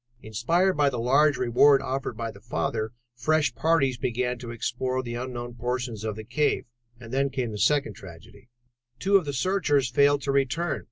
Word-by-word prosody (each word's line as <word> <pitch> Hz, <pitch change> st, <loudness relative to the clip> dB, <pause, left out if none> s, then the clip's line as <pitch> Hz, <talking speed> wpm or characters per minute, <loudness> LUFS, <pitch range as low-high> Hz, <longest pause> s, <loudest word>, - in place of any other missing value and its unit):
Inspired 170 Hz, -, +1 dB
by 145 Hz, -1 st, +3 dB
the 125 Hz, -, -4 dB
large 140 Hz, +5 st, +3 dB
reward 130 Hz, +3 st, +5 dB
offered 130 Hz, -3 st, -4 dB
by 115 Hz, 0 st, -3 dB
the 100 Hz, -2 st, -16 dB
father, 110 Hz, -1 st, -2 dB, 0.2 s
fresh 150 Hz, +6 st, +1 dB
parties 140 Hz, -6 st, +1 dB
began 125 Hz, +1 st, -1 dB
to 120 Hz, -1 st, -8 dB
explore 130 Hz, +2 st, -2 dB
the 120 Hz, -1 st, -5 dB
unknown 120 Hz, 0 st, -5 dB
portions 120 Hz, -2 st, -3 dB
of 110 Hz, -2 st, -3 dB
the 110 Hz, -, -7 dB
cave. 130 Hz, +7 st, 0 dB, 0.3 s
And 115 Hz, 0 st, -10 dB
then 140 Hz, +1 st, +1 dB
came 125 Hz, -4 st, -3 dB
the 105 Hz, -, -6 dB
second 145 Hz, +3 st, +2 dB
tragedy. 90 Hz, +6 st, -14 dB, 0.5 s
Two 195 Hz, +9 st, +4 dB
of 185 Hz, -, -2 dB
the 145 Hz, -, -2 dB
searchers 145 Hz, -4 st, +1 dB
failed 140 Hz, +1 st, +3 dB
to 140 Hz, -, 0 dB
return. 140 Hz, +4 st, 0 dB
130 Hz, 180 wpm, -26 LUFS, 120-145 Hz, 0.5 s, reward